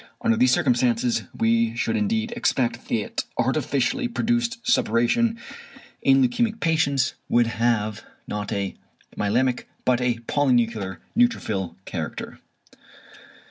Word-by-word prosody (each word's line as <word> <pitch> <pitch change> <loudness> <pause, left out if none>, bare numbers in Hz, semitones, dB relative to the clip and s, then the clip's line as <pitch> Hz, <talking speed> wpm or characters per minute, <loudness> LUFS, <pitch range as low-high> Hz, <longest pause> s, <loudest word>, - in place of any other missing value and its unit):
Under 230 -1 +3
these 255 +3 +4
circumstances 120 - +2
we 115 0 +1
should 115 -1 -1
indeed 220 +2 0
expect 135 - -1
that 110 -3 -1
artificially 245 - 0
produced 235 0 0
suppuration 225 - +2 0.6
in 135 -1 +5
leukæmic 225 - -1
patients 150 -5 +1 0.2
would 120 0 +4
have, 115 -2 0 0.2
not 105 -1 -4
a 100 -1 -2 0.4
myelæmic, 120 +5 0 0.2
but 125 -1 +2
a 125 -1 +1
polynuclear 115 -9 +1 0.2
neutrophil 110 - +1
character. - - -5
125 Hz, 105 wpm, -24 LUFS, -, 0.6 s, in